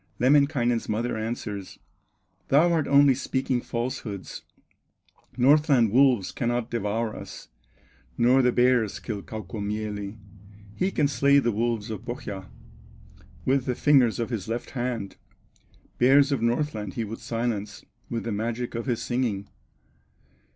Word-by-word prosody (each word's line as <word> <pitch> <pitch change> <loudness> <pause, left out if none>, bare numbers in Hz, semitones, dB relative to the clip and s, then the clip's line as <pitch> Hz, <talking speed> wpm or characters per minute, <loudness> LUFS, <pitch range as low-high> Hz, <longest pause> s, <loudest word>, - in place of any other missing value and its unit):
Lemminkainen's 130 -3 +2
mother 115 +3 -1
answers: 110 -3 -5 0.7
"Thou 165 +5 +4
art 160 -3 +1
only 140 -1 +6
speaking 130 -1 -1
falsehoods, 115 -5 -5 1.0
Northland 135 -3 +4
wolves 125 -5 +4
cannot 120 -1 -2
devour 110 0 -2
us, - - -10 0.7
Nor 125 +3 +4
the 125 -1 +3
bears 120 -5 +2
kill 100 +1 -5
Kaukomieli; 105 -1 -5 0.6
He 185 - 0
can 150 -6 +1
slay 140 +1 +3
the 120 -4 +2
wolves 115 0 -1
of 110 - -6
Pohya 100 - -6 1.0
With 130 0 +2
the 125 - -1
fingers 130 -6 +4
of 115 +2 -2
his 110 -5 -3
left 115 +2 -4
hand; 120 -6 -4 0.8
Bears 135 +3 +5
of 135 -5 0
Northland 115 -5 -1
he 115 - -1
would 110 +1 -6
silence 115 -3 -3 0.2
With 115 -1 -3
the 115 - -3
magic 115 +3 -3
of 115 +3 -4
his 120 -3 -1
singing. 115 -6 -2
120 Hz, 130 wpm, -26 LUFS, 110-130 Hz, 1.0 s, only